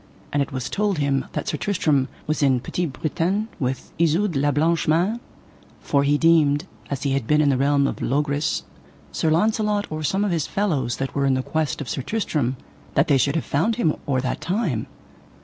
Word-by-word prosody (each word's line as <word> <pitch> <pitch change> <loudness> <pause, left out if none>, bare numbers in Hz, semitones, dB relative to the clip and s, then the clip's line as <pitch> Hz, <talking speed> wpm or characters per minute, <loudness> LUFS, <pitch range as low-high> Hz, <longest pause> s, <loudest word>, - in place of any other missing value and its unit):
And 145 - +2
it 140 - -2
was 130 -2 -3
told 205 -3 0
him 140 -2 +1
that - - -3
Sir 150 - -1
Tristram 150 -9 +1 0.2
was 155 0 -1
in 135 -3 +3
Petit 175 +8 -2
Britain 170 - -1
with 130 0 -3
Isoud 170 +3 +2
la 140 +2 +2
Blanche 160 +4 +1
Mains, 180 +9 +2 0.6
for 140 - +1
he 145 +1 +3
deemed, 160 -1 +4 0.2
an 140 - -1
he 140 - 0
had 135 -4 -1
been 150 +3 +4
in 150 -2 +4
the 135 - +3
realm 140 +1 +3
of - - -3
Logris, 145 +2 0 0.5
Sir 160 - 0
Launcelot 210 +4 +1
or 155 0 -3
some 190 +7 +1
of 200 - 0
his 165 -4 0
fellows 150 - -1
that 135 0 -3
were 140 -1 +1
in 135 - +3
the 130 - -1
quest 155 0 -1
of 140 - -5
Sir 135 - -2
Tristram 145 - -1 0.4
that 140 - +3
they 140 - +5
should 140 +4 +1
have 160 - -1
found 195 +11 +1
him 165 -10 +1
or 130 -2 +1
that 130 - -3
time. 175 - -1
150 Hz, 205 wpm, -23 LUFS, 140-170 Hz, 0.6 s, they